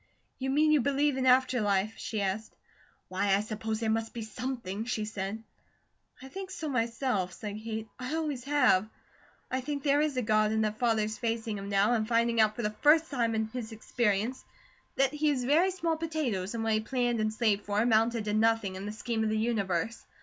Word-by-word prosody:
"You 265 0 -2
mean 305 +3 +3
you 300 -3 +5
believe 280 +1 +1
in 260 0 0
after 255 -1 +4
life?" 205 +1 +1
she 215 -2 -4
asked. 200 +3 -3 0.5
"Why, 195 +1 +1
I 200 - +1
suppose 220 0 -3
there 225 -1 -1
must 225 +1 -2
be 230 - -4
SOMETHING," 220 -3 -4
she 220 -3 -2
said. 210 +1 -4 0.8
"I - - -8
think 380 +6 -7
so 320 -5 -5
myself," 230 -6 -1
said 210 +1 -6
Kate. 220 -1 -4
"I 255 +5 -3
always 295 -6 -2
have. 250 -8 +3 0.6
I 260 0 0
think 285 +1 -4
there 285 0 +3
is 300 -3 0
a 250 - +1
God, 215 0 +2
and 220 0 +1
that 215 0 -3
Father 225 -3 +2
is 215 +1 -4
facing 225 -3 -2
Him 200 0 -6
now, 200 +4 +3
and 220 -2 0
finding 230 0 +3
out 215 0 +3
for 240 - -4
the 210 - 0
first 315 +2 +5
time 235 -4 0
in 220 0 +1
his 230 -1 -6
experience 220 +1 -1 0.5
that 270 +1 +2
he 300 0 +1
is 265 -4 0
very 310 +9 +4
small 335 -3 -1
potatoes, 265 - -2
and 225 - -2
what 225 0 +1
he 215 - +3
planned 240 +1 0
and 215 0 +1
slaved 215 -3 0
for 205 0 0
amounted 225 0 +2
to 210 - -1
nothing, 220 -2 +2
in 190 +2 -6
the - - -3
scheme 220 +1 -2
of 220 - +1
the 215 - 0
universe. 215 -3 -1
225 Hz, 215 wpm, -30 LUFS, 215-260 Hz, 0.8 s, you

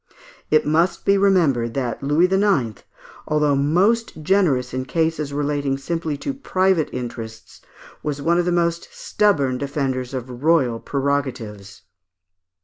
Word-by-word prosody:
It 155 - +3
must 165 +4 +1
be 200 - +4
remembered 165 - +2
that 125 -4 -2
Louis 145 +5 +3
IX., 185 - +1 0.5
although 150 -1 +2
most 175 +6 +1
generous 150 -10 +2
in 130 0 -3
cases 160 0 -1
relating 145 -1 -1
simply 160 0 -3
to 280 - -1
private 190 - +1
interests, 115 -3 -7 0.4
was 145 -1 -3
one 170 +4 +2
of 175 - +1
the 180 - +1
most 170 -1 0
stubborn 140 -12 +1
defenders 135 -2 -2
of 125 -1 -6
royal 140 -8 +3
prerogatives. 130 -9 -3
145 Hz, 130 wpm, -21 LUFS, 130-170 Hz, 0.5 s, be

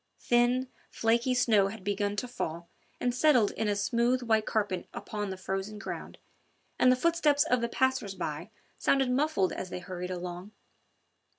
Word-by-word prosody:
Thin, 245 +2 +2 0.2
flaky 235 +3 +1
snow 215 -5 +4
had 205 -1 -8
begun 205 +1 -1
to 250 - -3
fall 170 -8 -5 0.3
and 245 0 0
settled 250 -5 +4
in 220 - -2
a 205 - +1
smooth 235 +5 +1
white 220 -2 +2
carpet 205 -4 -1
upon 210 -2 -4
the 190 - -5
frozen 195 +3 -4
ground, 200 - -7 0.6
and 255 - +6
the - - +5
footsteps 300 0 +3
of 250 -1 +1
the 235 - -1
passers 260 -7 0
by - - -4 0.3
sounded 270 -2 +2
muffled 260 -8 +1
as 185 - -5
they - - -5
hurried 180 0 -6
along. 180 +2 -6
220 Hz, 165 wpm, -29 LUFS, 195-250 Hz, 0.6 s, and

